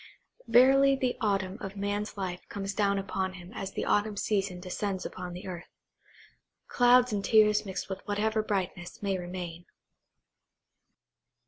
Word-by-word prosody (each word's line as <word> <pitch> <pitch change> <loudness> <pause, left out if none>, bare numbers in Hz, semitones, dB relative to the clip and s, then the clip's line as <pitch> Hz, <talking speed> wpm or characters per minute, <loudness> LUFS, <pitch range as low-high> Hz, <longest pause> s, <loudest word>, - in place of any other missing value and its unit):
Verily 270 +4 +6
the 255 -2 -1
autumn 195 -2 0
of 195 -1 -6
man's 205 +1 -2
life 185 -2 -3
comes 195 0 -4
down 200 -1 +1
upon 190 -1 -2
him 180 0 -11
as 195 - -5
the - - -2
autumn 205 0 +1
season 195 -4 -1
descends 190 +1 -3
upon 180 -1 -6
the 180 - -8
earth. 180 -2 -7 1.0
Clouds 245 -1 +5
and 200 -1 -1
tears 210 0 +4
mixed 190 0 -4
with 190 -1 -5
whatever 215 +2 +1
brightness 190 -3 -3
may 195 -1 +1
remain. 175 -1 -6
200 Hz, 140 wpm, -29 LUFS, 185-215 Hz, 1.0 s, Verily